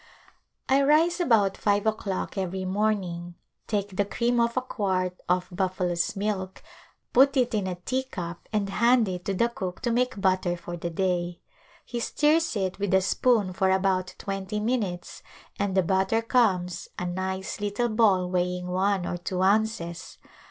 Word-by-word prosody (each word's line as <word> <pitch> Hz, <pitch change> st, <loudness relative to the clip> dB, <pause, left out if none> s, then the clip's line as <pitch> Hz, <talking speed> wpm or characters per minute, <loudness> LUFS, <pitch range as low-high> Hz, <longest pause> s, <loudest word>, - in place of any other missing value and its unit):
I 270 Hz, +1 st, +4 dB
rise 315 Hz, +5 st, +3 dB
about 220 Hz, -, +3 dB
five 205 Hz, -1 st, +1 dB
o'clock 215 Hz, -3 st, -2 dB
every 190 Hz, -1 st, -3 dB
morning, 185 Hz, -4 st, -1 dB, 0.3 s
take 205 Hz, -2 st, -2 dB
the 205 Hz, -, +3 dB
cream 235 Hz, +4 st, 0 dB
off 235 Hz, +1 st, +1 dB
a -, -, +3 dB
quart 185 Hz, -7 st, -2 dB
of 180 Hz, 0 st, +1 dB
buffalo's 180 Hz, -1 st, -1 dB
milk, 195 Hz, -2 st, -3 dB, 0.5 s
put 275 Hz, +2 st, +5 dB
it 250 Hz, -2 st, +2 dB
in 205 Hz, -3 st, 0 dB
a 180 Hz, -, -2 dB
teacup 180 Hz, -4 st, -4 dB
and 210 Hz, -2 st, 0 dB
hand 235 Hz, +3 st, +3 dB
it 180 Hz, -1 st, -5 dB
to 195 Hz, -, -1 dB
the 235 Hz, +5 st, +3 dB
cook 190 Hz, -6 st, -5 dB
to 240 Hz, -, 0 dB
make 250 Hz, -1 st, 0 dB
butter 185 Hz, -2 st, +1 dB
for 175 Hz, 0 st, -7 dB
the 170 Hz, 0 st, -4 dB
day. 175 Hz, 0 st, -1 dB, 0.5 s
He 240 Hz, -, -4 dB
stirs 300 Hz, +5 st, +2 dB
it 190 Hz, -2 st, -2 dB
with 200 Hz, -2 st, +1 dB
a 190 Hz, -, +5 dB
spoon 205 Hz, -1 st, +2 dB
for 190 Hz, +1 st, +1 dB
about 185 Hz, -1 st, +1 dB
twenty 195 Hz, +1 st, -4 dB
minutes 210 Hz, -6 st, -2 dB, 0.4 s
and 200 Hz, -1 st, 0 dB
the 190 Hz, -, +5 dB
butter 190 Hz, +5 st, +1 dB
comes 190 Hz, -7 st, +1 dB
— -, -, -40 dB
a 180 Hz, -, -3 dB
nice 190 Hz, +3 st, -3 dB
little 205 Hz, +4 st, 0 dB
ball 210 Hz, -5 st, +3 dB
weighing 180 Hz, 0 st, -1 dB
one 190 Hz, 0 st, +1 dB
or 175 Hz, -, -3 dB
two 180 Hz, +1 st, -2 dB
ounces. 195 Hz, -4 st, 0 dB
195 Hz, 165 wpm, -26 LUFS, 180-220 Hz, 0.5 s, put